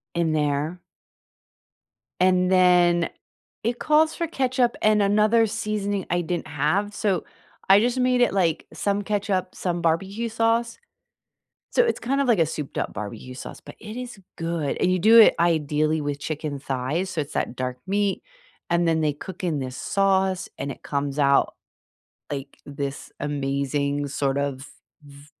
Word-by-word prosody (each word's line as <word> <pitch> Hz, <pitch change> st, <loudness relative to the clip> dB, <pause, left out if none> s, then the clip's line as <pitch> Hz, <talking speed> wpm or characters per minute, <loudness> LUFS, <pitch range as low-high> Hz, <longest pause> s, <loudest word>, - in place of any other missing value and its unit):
In 170 Hz, -2 st, +1 dB
there. 150 Hz, +3 st, -1 dB, 1.4 s
And 185 Hz, 0 st, +3 dB
then, 175 Hz, -2 st, +4 dB, 0.5 s
it 235 Hz, +2 st, -1 dB
calls 310 Hz, +1 st, +3 dB
for 335 Hz, -, -2 dB
ketchup 255 Hz, -5 st, +1 dB
and 215 Hz, -1 st, +4 dB
another 215 Hz, +3 st, +4 dB
seasoning 205 Hz, -3 st, -2 dB
I 175 Hz, -, +1 dB
didn't 175 Hz, +1 st, -3 dB
have. 155 Hz, +9 st, 0 dB
So, 200 Hz, -5 st, 0 dB, 0.5 s
I 195 Hz, +1 st, +8 dB
just 245 Hz, +3 st, +1 dB
made 250 Hz, 0 st, +2 dB
it, 245 Hz, -, +3 dB
like, 170 Hz, -5 st, 0 dB
some 200 Hz, 0 st, -1 dB
ketchup, 195 Hz, -3 st, -1 dB
some 175 Hz, -2 st, -2 dB
barbecue 195 Hz, +8 st, 0 dB
sauce. 230 Hz, +1 st, 0 dB, 0.9 s
So -, -, +4 dB
it's 465 Hz, -, 0 dB
kind 275 Hz, +3 st, 0 dB
of 275 Hz, -, 0 dB
like 225 Hz, -6 st, +4 dB
a 165 Hz, -, +5 dB
souped 150 Hz, -2 st, -6 dB
up -, -, -2 dB
barbecue 110 Hz, +4 st, -7 dB
sauce, 125 Hz, -, -9 dB
but -, -, -13 dB
it 220 Hz, +1 st, -8 dB
is 250 Hz, -3 st, -7 dB, 0.2 s
good. 165 Hz, -3 st, -2 dB
And -, -, +2 dB
you 185 Hz, -, +2 dB
do 220 Hz, +6 st, +7 dB
it 220 Hz, -, +8 dB
ideally 155 Hz, -2 st, +1 dB
with 145 Hz, -1 st, -3 dB
chicken 150 Hz, -2 st, -4 dB
thighs, 140 Hz, +7 st, -2 dB
so 185 Hz, -, -4 dB
it's 145 Hz, 0 st, -4 dB
that 125 Hz, -, -2 dB
dark 125 Hz, 0 st, -3 dB
meat 200 Hz, 0 st, 0 dB, 0.5 s
and 170 Hz, 0 st, +2 dB
then 160 Hz, -1 st, +2 dB
they 150 Hz, -1 st, +2 dB
cook 185 Hz, +5 st, -9 dB
in 160 Hz, -5 st, 0 dB
this 130 Hz, -1 st, -5 dB
sauce, 190 Hz, -1 st, +1 dB
and 140 Hz, -, -4 dB
it -, -, -11 dB
comes 140 Hz, 0 st, -3 dB
out 140 Hz, -1 st, +3 dB, 0.8 s
like 140 Hz, -1 st, -6 dB
this 140 Hz, -1 st, -5 dB
amazing 140 Hz, 0 st, -1 dB
sort 135 Hz, 0 st, -1 dB
of 140 Hz, -1 st, -3 dB, 0.4 s
v 140 Hz, 0 st, -15 dB
175 Hz, 165 wpm, -24 LUFS, 145-205 Hz, 1.4 s, I